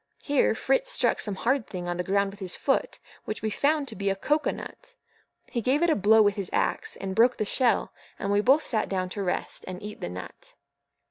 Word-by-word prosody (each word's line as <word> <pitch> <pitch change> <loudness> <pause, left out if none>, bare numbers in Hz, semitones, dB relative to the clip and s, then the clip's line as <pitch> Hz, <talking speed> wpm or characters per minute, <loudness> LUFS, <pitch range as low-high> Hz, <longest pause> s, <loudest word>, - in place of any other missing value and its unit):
Here 285 -1 +2
Fritz - - +1
struck - - +1
some 205 -5 -2
hard 250 +4 0
thing 180 -2 -6
on 175 0 -2
the 180 - -1
ground 200 +2 +1
with 200 - -14
his 185 -3 -4
foot, 270 - 0 0.3
which 215 - -5
we 220 - 0
found 290 +4 +1
to 225 - -4
be 200 -1 -1
a 195 - +1
CO 295 +10 +1
COA - - -1
NUT. - - -10 0.6
He 235 - -1
gave 270 +8 +2
it 345 - +4
a - - +3
blow 215 +2 +5
with 205 -1 +3
his 195 -3 -1
axe, - - -1
and 195 -1 -5
broke 240 +5 +4
the 215 - -1
shell, 245 +3 +1 0.2
and 200 - -2
we 205 0 +3
both 270 +7 +4
sat 220 -3 -1
down 185 -1 -1
to 200 - -4
rest, 180 -2 -2
and 185 -1 -6
eat 210 0 -8
the - - -3
nut. 90 0 -10
210 Hz, 240 wpm, -27 LUFS, 195-265 Hz, 0.6 s, blow